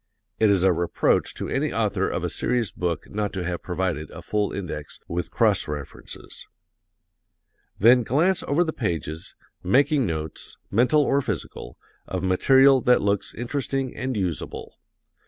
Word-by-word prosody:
(It 110 - +4
is 95 -3 +3
a 95 -1 +5
reproach 85 0 +1
to - - -4
any - - -1
author - - 0
of - - -3
a - - -1
serious 120 -4 0
book 85 -2 -3
not 105 -1 -2
to 95 -2 -3
have 85 0 -3
provided 90 -4 -2
a - - -10
full 105 -1 -1
index, 85 -7 -6
with 85 +1 -3
cross 105 -5 +2
references.) 75 -3 -7 1.3
Then 120 +5 +6
glance 160 - +2
over 150 +5 +3
the 160 -2 -3
pages, 80 - -4 0.3
making 135 - +3
notes, 80 -2 -5
mental 125 +8 +4
or 140 0 +2
physical, 105 - -5 0.3
of - - -3
material 130 +8 +5
that 125 +1 +3
looks 100 0 -1
interesting 135 +1 -2
and 130 -2 -3
usable. 90 -6 -4
105 Hz, 150 wpm, -24 LUFS, 90-130 Hz, 1.3 s, Then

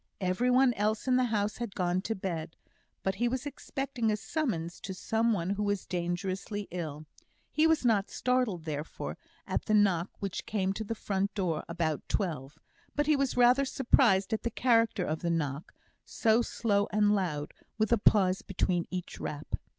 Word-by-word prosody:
Every 190 +6 +1
one 255 0 +5
else 215 +3 -1
in 255 - +4
the 255 - +3
house 210 -3 -1
had 235 -4 -5
gone 180 0 +1
to 225 +3 -2
bed; 170 -4 -4 0.5
but 190 - +1
he 240 - +4
was 255 +2 -2
expecting 270 -4 -2
a 210 - 0
summons 205 - -2
to 190 -1 -5
someone 220 -3 0
who 200 +1 -1
was 205 -2 -1
dangerously 185 +3 -3
ill. 155 -4 -5 0.5
He 310 +1 +4
was 320 -5 +2
not 215 -4 +3
startled, 250 -9 0
therefore, 155 0 -5 0.3
at - - -2
the 215 - +2
knock 195 -4 +3
which 195 -2 -4
came 195 -2 0
to 220 - -4
the 225 +2 -4
front 200 -1 -2
door 175 -6 -1
about 165 -3 -1
twelve; 155 -7 -2 0.4
but 295 - +2
he 305 0 +4
was 275 -3 0
rather 245 +3 +6
surprised 235 -7 +3
at 220 - 0
the 235 - -1
character 230 -5 +2
of 155 -1 -2
the 170 - -2
knock, 150 -3 -2 0.3
so 225 0 +2
slow 205 -3 0
and 210 0 +3
loud, 155 -7 -1 0.2
with 220 0 +1
a 235 - +4
pause 190 -3 +4
between 180 -2 -1
each 180 -1 -5
rap. 150 0 -6
205 Hz, 180 wpm, -30 LUFS, 175-235 Hz, 0.5 s, rather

